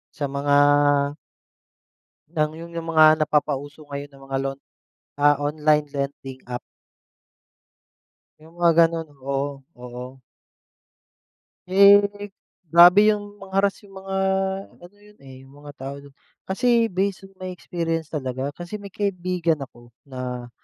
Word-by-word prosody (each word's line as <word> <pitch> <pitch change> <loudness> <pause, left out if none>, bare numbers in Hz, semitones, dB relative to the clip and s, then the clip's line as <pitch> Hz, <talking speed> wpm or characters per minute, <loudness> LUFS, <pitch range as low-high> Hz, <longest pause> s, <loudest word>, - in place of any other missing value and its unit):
sa 145 - -2
mga 145 +1 +1 1.8
ng 155 -2 0
yung 170 0 -10
yung 165 0 -5
mga 155 0 +7
napapauso 145 0 -1
ngayon 140 0 -6
na 135 0 -17
mga 135 0 -3
loan 135 0 -4 0.6
ah, 145 0 +5
online 150 0 +1
lending 140 -1 -5
app. 125 -1 -4 1.8
Yung 160 +2 -18
mga 170 -1 +4
ganun, 165 -1 -4
oo, 140 +1 -2 0.3
oo. 125 +1 -10 1.5
Eh, 200 +2 +8 0.7
grabe 180 +5 +8
yung 205 0 -8
mang-harass 195 +1 -1
yung 195 -1 -12
mga 195 0 -5 0.7
ano 175 +4 -15
yun, 210 0 -20
eh, 135 -1 -12
yung 135 - -18
mga 145 0 -10
tao 135 +1 -6
dun. 140 -1 -16 0.3
Kasi 235 +3 +1
based 195 +1 -2
on 195 - -27
may 185 -1 -6
experience 165 -3 -3
talaga. 130 -2 -3
Kasi 190 +4 -7
may 200 - -9
kaibigan 180 -5 -1
ako 120 -2 -12
na 125 -2 -6
155 Hz, 130 wpm, -23 LUFS, 140-190 Hz, 1.8 s, Eh